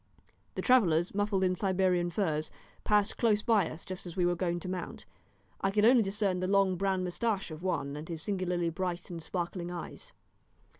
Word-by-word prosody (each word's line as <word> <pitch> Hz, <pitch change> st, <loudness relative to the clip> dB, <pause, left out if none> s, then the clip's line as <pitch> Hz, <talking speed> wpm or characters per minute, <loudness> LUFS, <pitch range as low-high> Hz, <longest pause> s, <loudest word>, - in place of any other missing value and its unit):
The -, -, -3 dB
travellers, 180 Hz, -10 st, +4 dB
muffled 205 Hz, -1 st, +1 dB
in 185 Hz, -1 st, +3 dB
Siberian 185 Hz, -2 st, +1 dB
furs, 160 Hz, -4 st, -1 dB, 0.3 s
passed 210 Hz, 0 st, +2 dB
close 215 Hz, -3 st, +3 dB
by 210 Hz, -7 st, +3 dB
us 160 Hz, -, -8 dB
just 185 Hz, 0 st, -7 dB
as 170 Hz, -, -8 dB
we 180 Hz, -, +3 dB
were 175 Hz, -, +3 dB
going 175 Hz, -1 st, -1 dB
to -, -, -6 dB
mount. 180 Hz, -1 st, -5 dB, 0.6 s
I 195 Hz, -, +2 dB
could 210 Hz, +2 st, +3 dB
only 245 Hz, +1 st, +7 dB
discern 195 Hz, -2 st, 0 dB
the 185 Hz, -, -1 dB
long 195 Hz, -1 st, +3 dB
brown 190 Hz, 0 st, 0 dB
moustache 195 Hz, +1 st, -1 dB
of 155 Hz, +1 st, -8 dB
one, 145 Hz, -6 st, -2 dB
and 150 Hz, +3 st, -7 dB
his 165 Hz, -2 st, -4 dB
singularly 180 Hz, -4 st, -1 dB
bright 180 Hz, +1 st, -4 dB
and 170 Hz, -1 st, -6 dB
sparkling 175 Hz, +1 st, -4 dB
eyes. 175 Hz, -1 st, -7 dB
185 Hz, 190 wpm, -31 LUFS, 175-200 Hz, 0.6 s, only